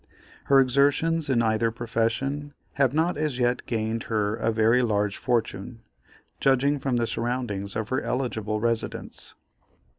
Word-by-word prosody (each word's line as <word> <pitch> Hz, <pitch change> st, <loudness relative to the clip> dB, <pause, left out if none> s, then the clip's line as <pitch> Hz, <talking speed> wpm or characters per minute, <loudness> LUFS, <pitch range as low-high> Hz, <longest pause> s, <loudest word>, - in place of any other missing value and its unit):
Her 135 Hz, -1 st, +5 dB
exertions 145 Hz, +4 st, +2 dB
in 120 Hz, -3 st, +3 dB
either 110 Hz, +1 st, +2 dB
profession 120 Hz, +5 st, -2 dB, 0.2 s
have 135 Hz, -3 st, +2 dB
not 160 Hz, +4 st, +1 dB
as 150 Hz, -4 st, -1 dB
yet 125 Hz, 0 st, +1 dB
gained 110 Hz, -1 st, -2 dB
her 105 Hz, -2 st, 0 dB
a 115 Hz, -, 0 dB
very 115 Hz, +3 st, +3 dB
large 105 Hz, -3 st, 0 dB
fortune, 115 Hz, -1 st, -2 dB, 0.6 s
judging 140 Hz, +2 st, +2 dB
from 130 Hz, -2 st, -1 dB
the 120 Hz, -1 st, +1 dB
surroundings 115 Hz, -5 st, -3 dB
of 110 Hz, -1 st, -3 dB
her 130 Hz, -, 0 dB
eligible 110 Hz, -5 st, -2 dB
residence. 115 Hz, 0 st, -3 dB
120 Hz, 140 wpm, -26 LUFS, 110-135 Hz, 0.6 s, Her